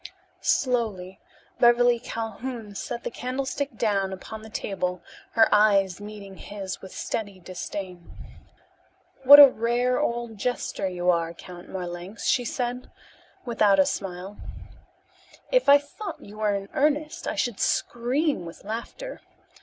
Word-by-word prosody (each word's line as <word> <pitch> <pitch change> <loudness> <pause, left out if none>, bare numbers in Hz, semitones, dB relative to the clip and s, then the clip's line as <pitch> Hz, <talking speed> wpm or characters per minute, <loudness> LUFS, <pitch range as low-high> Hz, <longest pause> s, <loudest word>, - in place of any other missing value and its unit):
Slowly 215 -8 0 0.4
Beverly 240 0 +5
Calhoun 225 -1 -5
set 235 +4 -5
the - - -4
candlestick 265 +1 -3
down 200 -4 +1
upon 215 +3 -8
the 220 - -11
table 180 -4 -3 0.3
her 225 -1 +6
eyes 200 -3 +4
meeting 205 -2 -9
his 195 -2 -6
with 190 - -10
steady 200 -4 -4
disdain. 180 0 -7 1.1
"What 285 +2 +11
a 285 - +13
rare 245 +1 0
old 235 -2 -2
jester 225 -4 -2
you 180 0 +1
are, 170 -1 -1
Count 175 +1 -11
Marlanx," 180 +2 -6
she 245 - +2
said 250 +1 -3 0.6
without 215 -5 +3
a 190 - +5
smile. 190 +1 -5 1.1
"If - - +3
I 285 - +10
thought 290 +9 -8
you 210 +1 -12
were 210 -1 +1
in 195 0 -5
earnest 300 +2 0
I - - -2
should 240 -5 -1
scream 255 - 0
with 165 0 -10
laughter. 235 - -6
215 Hz, 130 wpm, -26 LUFS, 190-245 Hz, 1.1 s, a